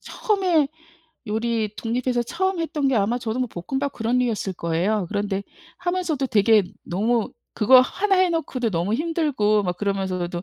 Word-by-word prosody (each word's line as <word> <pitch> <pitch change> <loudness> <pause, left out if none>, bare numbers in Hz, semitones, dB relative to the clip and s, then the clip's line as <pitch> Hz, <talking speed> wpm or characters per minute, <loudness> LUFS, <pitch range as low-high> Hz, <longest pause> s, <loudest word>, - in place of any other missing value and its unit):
처음에 370 - +1 0.6
요리 220 0 -1
독립해서 240 +1 -1
처음 365 +8 -1
했던 310 -4 -1
게 265 - +2
아마 220 +4 +1
저도 235 -1 -3
뭐 255 - 0
볶음밥 265 +10 -3
그런 235 +2 0
류였을 225 -6 -1
거예요. 180 +4 0
그런데 200 -1 -2 0.4
하면서도 350 -6 -1
되게 215 -2 +4 0.2
너무 220 +5 0 0.2
그거 255 +4 +7
하나 390 +9 +1
해 370 0 +4
놓고도 275 -8 -1
너무 180 +3 0
힘들고 280 -9 +1
막 180 -2 -2
그러면서도 185 -3 -2
235 Hz, 345 characters per minute, -23 LUFS, 205-285 Hz, 0.6 s, 그거